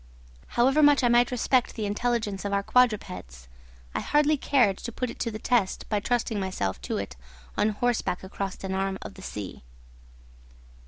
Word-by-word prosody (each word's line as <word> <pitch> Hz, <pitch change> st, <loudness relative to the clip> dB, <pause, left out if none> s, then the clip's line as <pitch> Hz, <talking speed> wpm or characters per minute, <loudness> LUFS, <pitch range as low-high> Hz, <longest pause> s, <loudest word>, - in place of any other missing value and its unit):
However 265 Hz, +5 st, +4 dB
much 290 Hz, -2 st, +6 dB
I 245 Hz, -, +4 dB
might 240 Hz, 0 st, +5 dB
respect 250 Hz, 0 st, +1 dB
the 215 Hz, -, -2 dB
intelligence 210 Hz, -1 st, -1 dB
of 200 Hz, -, -2 dB
our 200 Hz, 0 st, +1 dB
quadrupeds, 185 Hz, -, 0 dB, 0.5 s
I -, -, -1 dB
hardly 300 Hz, +1 st, +3 dB
cared 245 Hz, -8 st, +2 dB
to 235 Hz, -, -5 dB
put 250 Hz, +1 st, -3 dB
it -, -, -13 dB
to -, -, -1 dB
the 215 Hz, -, -5 dB
test 220 Hz, -3 st, 0 dB
by 210 Hz, -, +1 dB
trusting 225 Hz, 0 st, 0 dB
myself 185 Hz, -, -2 dB
to -, -, -3 dB
it 65 Hz, -, -5 dB, 0.4 s
on 215 Hz, -, +2 dB
horseback 225 Hz, -4 st, -1 dB
across 195 Hz, 0 st, -5 dB
an 190 Hz, 0 st, -3 dB
arm 195 Hz, 0 st, -1 dB
of -, -, -8 dB
the 190 Hz, -, -12 dB
sea. 105 Hz, -, -6 dB
215 Hz, 175 wpm, -27 LUFS, 195-245 Hz, 0.5 s, much